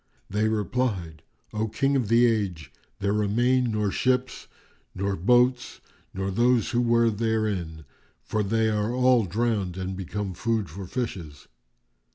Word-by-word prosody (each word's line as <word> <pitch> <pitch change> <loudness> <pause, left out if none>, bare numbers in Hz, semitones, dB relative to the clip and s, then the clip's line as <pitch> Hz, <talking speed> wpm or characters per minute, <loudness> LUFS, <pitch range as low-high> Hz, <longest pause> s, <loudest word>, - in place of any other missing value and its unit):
They 105 +2 +1
replied, 105 -7 -2 0.3
"O 110 +1 -1
King 135 +6 0
of 125 -5 +1
the 115 +3 +5
Age, 100 -9 -1 0.3
there 100 0 +1
remain 120 +5 +2
nor 105 -2 0
ships 130 +3 -1 0.5
nor 100 +1 -1
boats 125 +7 +2 0.3
nor 95 +1 -3
those 120 +2 +2
who 120 0 +2
were 115 -1 +3
therein; 105 -8 -2 0.4
for 105 - -1
they 110 +2 +1
are 105 +1 0
all 125 -3 +4
drowned 100 -2 -1
and 95 0 -4
become 95 +1 -4
food 110 -2 -1
for 95 +2 -7
fishes." 90 - -5
110 Hz, 140 wpm, -26 LUFS, 95-120 Hz, 0.5 s, the